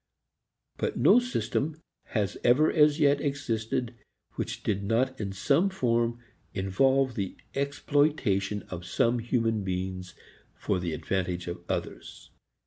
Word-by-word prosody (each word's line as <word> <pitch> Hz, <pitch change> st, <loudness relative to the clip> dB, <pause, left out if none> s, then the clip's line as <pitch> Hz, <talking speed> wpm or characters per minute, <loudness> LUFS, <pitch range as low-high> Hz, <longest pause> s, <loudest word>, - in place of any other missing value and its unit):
But -, -, -2 dB
no -, -, +6 dB
system 160 Hz, -, -2 dB, 0.3 s
has 105 Hz, -3 st, -1 dB
ever 135 Hz, +6 st, +5 dB
as 150 Hz, -1 st, +4 dB
yet 140 Hz, -1 st, +4 dB
existed 125 Hz, -4 st, -2 dB, 0.4 s
which -, -, -4 dB
did 100 Hz, -1 st, -1 dB
not 130 Hz, +5 st, 0 dB
in 100 Hz, -2 st, -3 dB
some 145 Hz, -, +2 dB
form 120 Hz, -8 st, 0 dB, 0.4 s
involve 130 Hz, +8 st, +2 dB
the 100 Hz, -4 st, -4 dB, 0.2 s
exploitation 140 Hz, -, +1 dB
of 90 Hz, -1 st, -5 dB
some 115 Hz, +6 st, +1 dB
human 115 Hz, -2 st, 0 dB
beings 90 Hz, 0 st, -4 dB, 0.4 s
for 95 Hz, -, -1 dB
the 85 Hz, -2 st, -3 dB
advantage 90 Hz, 0 st, -2 dB
of 85 Hz, 0 st, -5 dB
others. -, -, -5 dB
115 Hz, 125 wpm, -28 LUFS, 95-140 Hz, 0.4 s, no